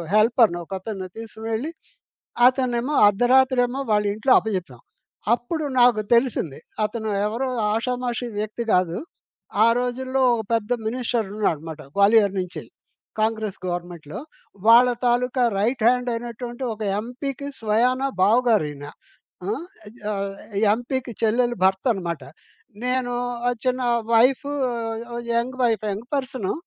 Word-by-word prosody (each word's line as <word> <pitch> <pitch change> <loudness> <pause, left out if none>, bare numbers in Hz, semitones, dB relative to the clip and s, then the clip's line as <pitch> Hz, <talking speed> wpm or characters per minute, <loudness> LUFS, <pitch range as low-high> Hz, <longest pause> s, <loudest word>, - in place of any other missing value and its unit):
హెల్పర్‌ని 215 -4 +4
ఒక 195 - -9
అతన్ని 190 -3 -6
తీసుకొని 225 0 -7
వెళ్లి, 260 +9 -2 0.8
అతనేమో 255 +1 -1
అర్ధరాత్రి 250 +4 +4
ఏమో 265 +3 -3
వాళ్ళ 210 0 +3
ఇంట్లో 255 +5 +3
అప్పజెప్పాం. 180 - -4 0.5
అప్పుడు 310 +7 -4 0.2
నాకు 240 -3 +5
తెలిసింది. 235 - +1 0.3
అతను 220 -1 -4 0.2
ఎవరో 235 +5 -2 0.3
ఆషామాషీ 245 +1 -2
వ్యక్తి 215 +2 -3
గాదు. 180 -1 +2 0.7
ఆ - - +6
రోజుల్లో 260 +2 -2
ఒక 225 - -2
పెద్ద 225 +1 0
మినిస్టర్ 240 -1 -1
ఉన్నాడన్నమాట 160 -6 -2
గ్వాలియర్ 200 0 +5
నుంచె, 180 -1 -4 0.6
కాంగ్రెస్ 220 -2 -1
గవర్నమెంట్‌లో. 175 -4 -5 0.5
వాళ్ళ 235 +2 +8 0.2
తాలూకా 250 +1 +1 0.2
రైట్‌హ్యాండ్ 245 +2 +2
అయినటువంటి 240 +2 -6
ఒక 215 - -8 0.2
ఎంపీ‌కి 270 +4 -5
స్వయానా 245 +5 +2 0.2
బావగారు 225 -3 +4
ఈయన. 145 0 -9 0.6
ఆ! - - 0 0.6
ఆహ్, 195 0 -3 0.4
ఎంపీ‌కి 245 0 -4
చెల్లెలు 240 +2 +2
భర్తన్నమాట. 190 - 0 0.6
నేను 250 -1 0 0.3
ఆ - - +4 0.2
చిన్న 255 0 +1 0.3
wife 255 +5 +4 0.9
young 245 +2 -1
wife 220 -3 +1
young 215 +5 -7
person 255 -7 -2
230 Hz, 115 wpm, -23 LUFS, 205-250 Hz, 0.9 s, వాళ్ళ